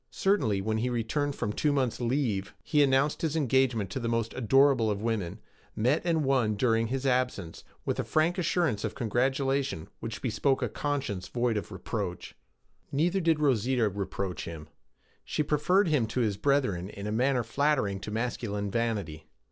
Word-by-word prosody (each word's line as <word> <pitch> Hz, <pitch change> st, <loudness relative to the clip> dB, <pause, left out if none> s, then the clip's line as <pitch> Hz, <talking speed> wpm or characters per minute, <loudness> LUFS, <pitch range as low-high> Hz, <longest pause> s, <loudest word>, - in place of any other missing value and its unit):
Certainly, 110 Hz, -, +1 dB
when 110 Hz, +2 st, -1 dB
he 125 Hz, +3 st, 0 dB
returned 135 Hz, +5 st, -1 dB
from 105 Hz, -, -2 dB
a -, -, -7 dB
two 150 Hz, -, +1 dB
months' 130 Hz, -4 st, 0 dB
'leave,' 120 Hz, -6 st, -1 dB
he 150 Hz, -, +2 dB
announced 140 Hz, +1 st, +2 dB
his 160 Hz, -2 st, -1 dB
engagement 130 Hz, -, +1 dB
to 130 Hz, -, -3 dB
the 115 Hz, -, -3 dB
most 115 Hz, -1 st, -1 dB
adorable 130 Hz, -1 st, +4 dB
of 100 Hz, -1 st, -1 dB
women, 105 Hz, -4 st, -2 dB, 0.4 s
met 125 Hz, +8 st, +2 dB
and 165 Hz, -4 st, +1 dB
won 125 Hz, -6 st, +2 dB
during 115 Hz, +1 st, +2 dB
his 135 Hz, +3 st, -3 dB
absence, 125 Hz, -10 st, -1 dB, 0.2 s
with -, -, -1 dB
a -, -, +1 dB
frank 165 Hz, +4 st, +1 dB
assurance 170 Hz, -, +1 dB
of 110 Hz, -, -3 dB
congratulation 130 Hz, -, 0 dB
which 115 Hz, 0 st, -6 dB
bespoke 130 Hz, +3 st, +1 dB
a -, -, 0 dB
conscience 135 Hz, -11 st, -3 dB
void 120 Hz, -1 st, 0 dB
of 105 Hz, -4 st, -4 dB
reproach. -, -, -5 dB, 0.6 s
Neither 170 Hz, +7 st, +1 dB
did 165 Hz, -2 st, +2 dB
Rosita 125 Hz, -4 st, +2 dB
reproach 100 Hz, -1 st, -4 dB
him. 80 Hz, -2 st, -8 dB, 0.5 s
She 150 Hz, -, -1 dB
preferred 165 Hz, +7 st, +2 dB
him 145 Hz, -8 st, +2 dB
to 125 Hz, +3 st, -1 dB
his 105 Hz, -4 st, +1 dB
brethren 105 Hz, -7 st, +1 dB
in 100 Hz, -1 st, -8 dB
a 105 Hz, -, -2 dB
manner 125 Hz, +2 st, +2 dB
flattering 115 Hz, -5 st, +1 dB
to 100 Hz, -, -7 dB
masculine 105 Hz, -3 st, -2 dB
vanity. 100 Hz, -10 st, -2 dB
125 Hz, 170 wpm, -29 LUFS, 105-140 Hz, 0.6 s, adorable